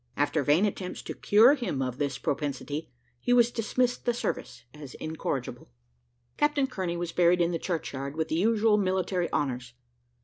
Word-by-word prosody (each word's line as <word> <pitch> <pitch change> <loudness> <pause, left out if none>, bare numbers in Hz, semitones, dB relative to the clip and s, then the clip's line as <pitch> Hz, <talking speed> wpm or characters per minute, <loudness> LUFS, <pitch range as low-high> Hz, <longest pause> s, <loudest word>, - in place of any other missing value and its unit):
After 145 +1 +1
vain 150 +8 +3
attempts 190 -3 -4
to - - -5
cure 225 +6 +5
him 240 - -2
of 125 -1 -3
this 140 -3 -1
propensity, 145 +1 -3 0.3
he 245 - +1
was 240 -1 +5
dismissed 245 +2 0
the 240 -1 0
service 125 - -4
as 145 -4 -10
incorrigible. 155 - -4 0.7
Captain 295 -2 +2
Kearney 185 -9 -3
was 170 -1 -3
buried 175 0 +3
in 170 0 +2
the 165 - -2
churchyard 140 -6 -4
with 160 0 -1
the - - 0
usual 215 +3 +3
military 185 -2 0
honours. 125 -4 -2
170 Hz, 165 wpm, -28 LUFS, 145-210 Hz, 0.7 s, cure